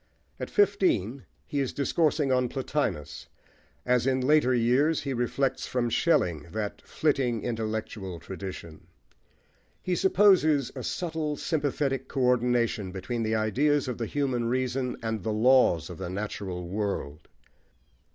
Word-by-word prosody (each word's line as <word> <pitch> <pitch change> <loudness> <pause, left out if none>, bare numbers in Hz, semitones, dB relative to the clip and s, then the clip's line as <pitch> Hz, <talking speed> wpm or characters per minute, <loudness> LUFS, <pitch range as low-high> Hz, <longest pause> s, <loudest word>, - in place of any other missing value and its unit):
At - - -4
fifteen 160 - +1 0.2
he 145 - -3
is 135 -2 -1
discoursing 150 0 +1
on 125 -1 +2
Plotinus, 75 - -3 0.6
as 125 0 +2
in 130 0 +2
later 135 0 +3
years 125 +6 +2
he 135 -1 -2
reflects 130 +2 -1
from 120 -2 -1
Schelling 85 - +1
that 105 -1 -4
flitting 130 -7 0
intellectual 110 -5 -4
tradition. 85 -2 -8 1.0
He 180 - 0
supposes 180 - +4
a - - -5
subtle, 160 -4 -3
sympathetic 140 -3 -1
co 135 - -3
ordination 120 -5 +1
between 115 +5 -4
the 110 0 0
ideas 135 +7 +1
of 125 -2 -4
the 115 - -2
human 130 -4 -1
reason 125 +1 -1
and 110 -2 -2
the 110 - -2
laws 110 -6 +4
of 90 -1 -9
the 95 -2 -4
natural 95 -2 -4
world. 90 -6 -4
125 Hz, 130 wpm, -27 LUFS, 105-140 Hz, 1.0 s, supposes